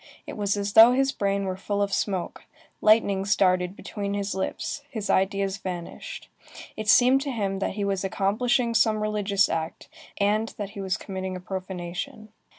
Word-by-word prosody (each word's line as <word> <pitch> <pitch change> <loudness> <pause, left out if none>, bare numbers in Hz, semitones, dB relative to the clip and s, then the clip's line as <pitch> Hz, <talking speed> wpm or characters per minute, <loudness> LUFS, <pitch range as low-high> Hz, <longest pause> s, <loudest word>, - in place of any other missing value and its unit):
It - - -7
was 205 -1 0
as 200 0 -2
though 225 +2 +9
his 270 +1 +2
brain 200 -4 -1
were 185 -1 -2
full 200 +2 -3
of 200 -1 0
smoke; 190 -4 -2 0.4
lightnings 200 -2 +3
darted 185 -1 +2
between 200 -1 -4
his 200 0 -2
lips; 190 +8 -3
his 220 -6 -3
ideas 195 0 +1
vanished; 185 - -7 0.5
it 215 -1 -5
seemed 255 +4 +6
to 280 0 -3
him 200 -5 -2
that - - -2
he 205 -1 -1
was 195 -1 -1
accomplishing 230 +5 +1
some 220 -1 +3
religious 205 -2 +1
act, 160 0 -4 0.3
and 210 +2 0
that 205 -1 -5
he 200 - -7
was 190 -1 -1
committing 190 -1 -5
a - - -5
profanation. 185 +3 -6
200 Hz, 170 wpm, -26 LUFS, 190-215 Hz, 0.5 s, though